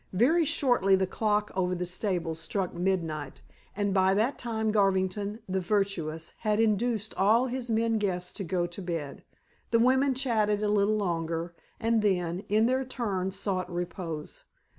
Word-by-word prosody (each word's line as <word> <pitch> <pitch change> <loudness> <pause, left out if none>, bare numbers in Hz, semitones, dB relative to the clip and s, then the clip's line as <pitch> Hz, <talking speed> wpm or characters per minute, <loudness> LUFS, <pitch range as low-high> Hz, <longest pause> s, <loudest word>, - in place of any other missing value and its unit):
Very 300 - +4
shortly 245 - +3
the 190 0 +1
clock 210 +2 0
over 180 -1 0
the 180 0 -2
stables 175 -3 -2
struck 185 +2 -2
midnight, 165 -6 -2 0.3
and 205 -1 0
by 190 0 +3
that 230 +7 +1
time 220 -2 -1
Garvington 200 +1 +1
the 190 0 -1
virtuous 175 -5 -1
had 215 0 0
induced 220 0 +1
all 220 +6 +4
his 250 -1 -4
men 225 0 +1
guests 180 -3 -2
to 200 - -5
go 175 0 0
to 175 +3 -7
bed. 165 -6 -5 0.5
The 230 - +3
women 260 +3 +3
chatted 215 -5 +1
a 210 - +1
little 210 +1 +2
longer, 170 -3 -2 0.3
and 230 -1 +2
then, 180 -4 0
in 215 +2 +4
their 260 +2 +1
turn, 205 -8 -2
sought 190 -2 -3
repose. 175 -3 -5
200 Hz, 160 wpm, -28 LUFS, 180-220 Hz, 0.5 s, Very